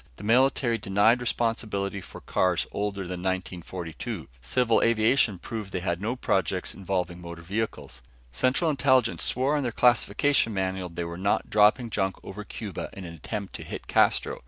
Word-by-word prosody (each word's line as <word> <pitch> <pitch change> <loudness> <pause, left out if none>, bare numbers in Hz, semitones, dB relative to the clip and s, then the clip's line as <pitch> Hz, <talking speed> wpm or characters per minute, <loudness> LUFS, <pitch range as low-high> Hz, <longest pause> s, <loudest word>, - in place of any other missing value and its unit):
The - - -11
military 120 +1 +3
denied 105 +4 +3
responsibility 110 -4 -1
for - - -11
cars 90 -2 +1
older 100 -1 -2
than 90 0 -5
1942. 90 -2 -4
Civil 115 - +2
aviation 115 -1 +3
proved 105 +2 -6
they 90 - -2
had 85 0 -2
no 115 +4 -1
projects 95 -6 0
involving 90 -2 -3
motor 85 -1 -8
vehicles. 100 - -4 0.3
Central 130 - +2
Intelligence 130 - +3
swore 135 +4 +1
on 145 - +1
their 125 -3 -1
classification 120 0 +3
manual 95 -1 -2
they 85 +1 -4
were 85 +1 -6
not 100 +2 0
dropping 110 +3 +4
junk 95 -2 0
over 105 +2 -7
Cuba 105 -3 -6
in 95 - -8
an 85 - -8
attempt 95 +5 -5
to - - -6
hit - - -7
Castro. - - +2
100 Hz, 160 wpm, -27 LUFS, 90-115 Hz, 0.3 s, dropping